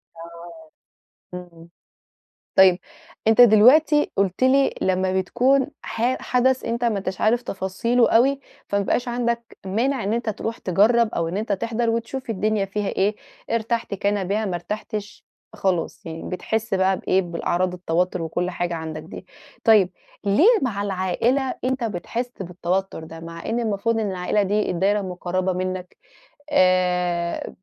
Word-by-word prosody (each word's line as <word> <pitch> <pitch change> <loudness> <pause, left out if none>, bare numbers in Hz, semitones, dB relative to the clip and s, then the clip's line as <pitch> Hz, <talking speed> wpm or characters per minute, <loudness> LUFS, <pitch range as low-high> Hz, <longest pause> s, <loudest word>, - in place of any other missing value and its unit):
آه. 170 - -12 0.6
إمم. 170 -2 -10 0.9
طيب، 190 -1 +7 0.5
أنت 225 +2 +5
دلوقتي 255 +7 +6
قُلت 195 +3 0
لي 270 +1 +3
لمّا 185 0 +1
بتكون 255 +8 +2 0.2
ح 245 +3 -1
حدث 255 +1 +1
أنت 235 +1 -2
ما 220 -4 +1
أنتاش 190 -1 -5
عارف 235 +3 +2
تفاصيله 230 +5 0
أوي، 270 +4 +3 0.3
فما 200 0 +1
بيبقاش 245 +5 0
عندك 235 -1 -2
مانع 235 +5 0
إن 205 - -1
أنت 235 -1 -2
تروح 225 +2 -5
تجرّب 215 +5 +3
أو 165 -1 -1
إن 180 - -4
أنت 215 0 -2
تحضر 230 +3 -1
وتشوف 230 +2 -3
الدنيا 215 0 0
فيها 200 +1 -3
إيه، 205 +2 0 0.3
ارتحت 230 -2 -1
كان 200 -1 -1
بها، 215 +2 0
ما 185 -3 -2
ارتحتش 210 +3 -6 0.3
خلاص. 185 -6 -2
يعني 165 0 -6
بتحِس 220 +3 -2
بقى 190 0 +2
بإيه، 190 +1 +1
بالأعراض 175 +1 -1
التوتُّر 180 0 -1
وكل 175 +3 -2
حاجة 175 -1 -3
عندك 160 -1 -5
دي. 165 - -10 0.4
طيب، 210 -6 +5 0.3
ليه 205 - +4 0.2
مع 205 -6 -1
العائلة 205 +8 0
أنت 260 -1 -1
بتحِس 230 +5 -3
بالتوتُّر 180 -1 -3
ده، 165 +1 -10
مع 165 0 -9
إن 235 +2 -1
المفروض 225 +1 0
إن 210 -3 -1
العائلة 185 +3 0
دي 205 +1 0
الدايرة 195 +4 +1
المُقرّبة 185 0 -2
منّك، 185 0 -4 0.6
آآ 180 -3 +1
200 Hz, 145 wpm, -23 LUFS, 180-230 Hz, 0.9 s, طيب